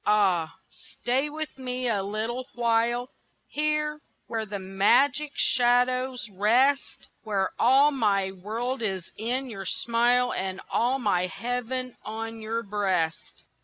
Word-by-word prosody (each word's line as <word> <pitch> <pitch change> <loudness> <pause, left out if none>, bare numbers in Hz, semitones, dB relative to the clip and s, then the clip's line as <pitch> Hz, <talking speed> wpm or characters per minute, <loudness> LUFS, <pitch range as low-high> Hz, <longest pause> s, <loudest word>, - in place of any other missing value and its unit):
Ah, 190 -6 +2
stay 265 +4 -2
with 305 -2 -5
me 255 -1 -2
a 210 -4 +1
little 220 +6 -3
while 240 +1 +1 0.4
Here, 300 0 -1 0.2
where 220 -1 -3
the 205 0 -4
magic 245 +10 +2
shadows 250 0 +2
rest, 245 +8 +2 0.2
Where 200 -3 0
all 270 +4 +6
my 200 -7 +1
world 230 +7 -4
is 190 -5 -3
in 250 +5 -2
your 195 -5 -6
smile 240 +2 +2
And 190 0 -3
all 250 +3 +2
my 190 -7 +1
heaven 250 +4 -4
on 225 +1 -5
your 225 +1 -2
breast. 190 -6 -2
235 Hz, 125 wpm, -27 LUFS, 205-255 Hz, 0.4 s, all